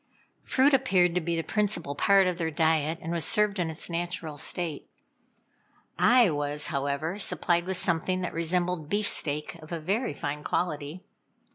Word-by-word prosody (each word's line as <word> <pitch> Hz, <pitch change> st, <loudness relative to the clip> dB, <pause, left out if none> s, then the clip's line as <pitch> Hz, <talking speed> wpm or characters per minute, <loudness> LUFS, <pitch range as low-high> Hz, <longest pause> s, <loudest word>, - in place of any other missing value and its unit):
Fruit 275 Hz, +2 st, +2 dB
appeared 190 Hz, -10 st, +3 dB
to 180 Hz, -, 0 dB
be 170 Hz, +1 st, -2 dB
the 165 Hz, -, -1 dB
principal 200 Hz, -9 st, -1 dB
part 195 Hz, +6 st, +4 dB
of 180 Hz, -1 st, -1 dB
their 165 Hz, -1 st, 0 dB
diet, 160 Hz, 0 st, +1 dB
and 165 Hz, -, -4 dB
was 170 Hz, -2 st, 0 dB
served 210 Hz, +2 st, +2 dB
in 170 Hz, -2 st, 0 dB
its 160 Hz, -, -7 dB
natural 170 Hz, -2 st, -3 dB
state. 155 Hz, +1 st, -1 dB, 1.1 s
I 245 Hz, -7 st, +5 dB
was, 145 Hz, 0 st, -2 dB
however, 140 Hz, +7 st, -2 dB
supplied 175 Hz, -3 st, +1 dB
with 190 Hz, -1 st, 0 dB
something 180 Hz, +2 st, 0 dB
that 180 Hz, -, -4 dB
resembled 170 Hz, -1 st, -1 dB
beefsteak 155 Hz, -7 st, 0 dB
of 155 Hz, -, -13 dB
a 170 Hz, -, -3 dB
very 195 Hz, -, -2 dB
fine 145 Hz, +1 st, -4 dB
quality. 155 Hz, 0 st, -3 dB
170 Hz, 160 wpm, -27 LUFS, 155-185 Hz, 1.1 s, I